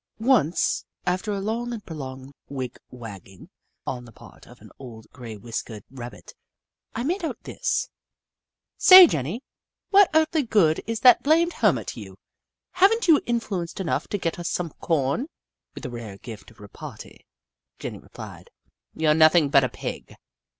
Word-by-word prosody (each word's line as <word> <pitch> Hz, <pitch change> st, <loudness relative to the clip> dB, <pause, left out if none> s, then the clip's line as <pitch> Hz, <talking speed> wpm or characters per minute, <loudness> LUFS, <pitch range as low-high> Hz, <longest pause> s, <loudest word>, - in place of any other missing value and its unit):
Once, 225 Hz, -, +2 dB, 0.2 s
after 185 Hz, +4 st, -1 dB
a 200 Hz, -, -2 dB
long 230 Hz, +4 st, -3 dB
and 225 Hz, -4 st, -7 dB
prolonged 135 Hz, -4 st, -8 dB, 0.2 s
wig 130 Hz, -3 st, -6 dB
wag 115 Hz, -6 st, -10 dB
ging 95 Hz, -1 st, -16 dB, 0.3 s
on 125 Hz, -1 st, -4 dB
the 120 Hz, -, -14 dB
part -, -, -16 dB
of -, -, -16 dB
an -, -, -16 dB
old, 115 Hz, -4 st, -11 dB
grey 115 Hz, -4 st, -9 dB
whiskered 115 Hz, -1 st, -6 dB
Rabbit, 125 Hz, -2 st, -10 dB, 0.6 s
I 235 Hz, -, -2 dB
made 350 Hz, +7 st, -2 dB
out 325 Hz, -, -3 dB
this: -, -, -2 dB, 0.5 s
" -, -, -66 dB
Say, 370 Hz, -1 st, +13 dB
Jenny, 165 Hz, -, -3 dB, 0.5 s
what 395 Hz, -2 st, +6 dB
earthly 315 Hz, 0 st, +3 dB
good 200 Hz, -, +2 dB
is 230 Hz, 0 st, -3 dB
that 250 Hz, -2 st, +7 dB
blamed 330 Hz, +4 st, +3 dB
hermit -, -, +1 dB
to -, -, -7 dB
you? -, -, -11 dB, 0.5 s
Have 385 Hz, +3 st, +5 dB
n't 455 Hz, -2 st, -1 dB
you 320 Hz, -3 st, +6 dB
influence 205 Hz, -8 st, -2 dB
enough 185 Hz, -4 st, -2 dB
to 205 Hz, -, -2 dB
get 170 Hz, -2 st, -3 dB
us 170 Hz, -, -3 dB
some 170 Hz, -3 st, -3 dB
corn? 155 Hz, -, 0 dB, 0.5 s
With -, -, -8 dB
a 125 Hz, -, -5 dB
rare 115 Hz, -5 st, -8 dB
gift 110 Hz, 0 st, -11 dB
of 110 Hz, -, -21 dB
repartee, 100 Hz, -1 st, -11 dB, 0.5 s
Jenny -, -, -7 dB
replied: -, -, -12 dB, 0.3 s
" -, -, -62 dB
You 160 Hz, -, -1 dB
're -, -, +6 dB
nothing 155 Hz, -1 st, +5 dB
but 140 Hz, -1 st, +5 dB
a 130 Hz, -, 0 dB
pig. -, -, -7 dB
165 Hz, 170 wpm, -24 LUFS, -, 0.6 s, Say